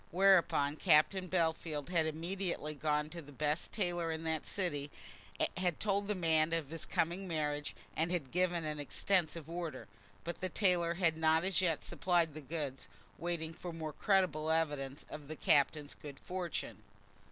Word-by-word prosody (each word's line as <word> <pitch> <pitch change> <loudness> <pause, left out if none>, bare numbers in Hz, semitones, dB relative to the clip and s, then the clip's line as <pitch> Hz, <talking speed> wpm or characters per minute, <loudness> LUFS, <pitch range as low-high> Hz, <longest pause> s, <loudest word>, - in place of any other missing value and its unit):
Whereupon 175 -6 +4
Captain 185 +3 +4
Bellfield 160 -3 0
had 165 -3 +2
immediately 170 -1 -2
gone 150 0 0
to 170 - -6
the 145 -2 -13
best 150 +3 -1
tailor 175 -5 0
in 160 0 -4
that 160 -1 -2
city, 145 -7 -2 0.7
had 180 -3 0
told 200 -1 0
the 210 - 0
man 160 -2 +2
of 160 -3 -1
his 165 - -4
coming 175 +4 0
marriage, 150 -3 -2 0.2
and 165 +2 +1
had 155 -8 -2
given 175 -2 +1
an 150 -1 -3
extensive 165 +1 0
order. 170 -1 -5 0.4
But 170 - -5
the 185 - -1
tailor 175 -3 +2
had 165 -3 +2
not 160 0 +3
as 190 0 +2
yet 165 -4 +1
supplied 170 -4 +1
the 155 - -7
goods, 145 -2 -4 0.3
waiting 165 -2 -2
for 175 +2 -7
more 160 -2 -5
credible 175 -6 +2
evidence 145 -4 0
of 150 -2 -8
the 155 - -5
Captain's 145 0 +2
good 140 -2 -9
fortune. 180 -2 -4
165 Hz, 165 wpm, -34 LUFS, 150-175 Hz, 0.7 s, Whereupon